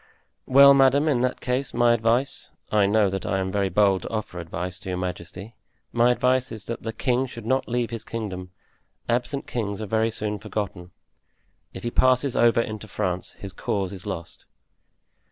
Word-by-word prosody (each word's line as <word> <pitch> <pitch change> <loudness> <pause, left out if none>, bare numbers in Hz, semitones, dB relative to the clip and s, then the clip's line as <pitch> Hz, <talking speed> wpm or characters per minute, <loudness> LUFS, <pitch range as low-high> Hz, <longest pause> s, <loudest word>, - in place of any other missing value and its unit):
"Well, 140 +1 +8
madame, 140 +2 +4
in 135 -6 +2
that 125 0 -1
case, 125 +1 -2
my 120 0 +4
advice—I 115 -3 0
know 105 0 +3
that 95 -1 -3
I 95 - -1
am 95 0 -2
very 100 -1 0
bold 95 0 +3
to - - -6
offer 110 -5 -4
advice 90 +2 -5
to 95 - -8
your 90 - -2
majesty—my 90 +6 -3
advice 125 +1 +1
is 110 -1 -7
that 115 0 -5
the 115 - -4
king 125 +2 0
should 115 -3 -9
not 130 +3 +1
leave 120 -1 -1
his 115 -2 -4
kingdom. 95 -5 -5 0.6
Absent 125 +4 -1
kings 100 -4 -3
are 110 - -3
very 110 +2 +1
soon 105 -2 -3
forgotten; 100 -4 -5 0.8
if - - -9
he 120 - -2
passes 130 +1 +3
over 115 0 +4
into 110 -1 -6
France 95 -4 -3
his 100 -2 -8
cause 95 0 -2
is 95 +1 -9
lost." 90 -4 -6
110 Hz, 175 wpm, -25 LUFS, 95-125 Hz, 0.8 s, Well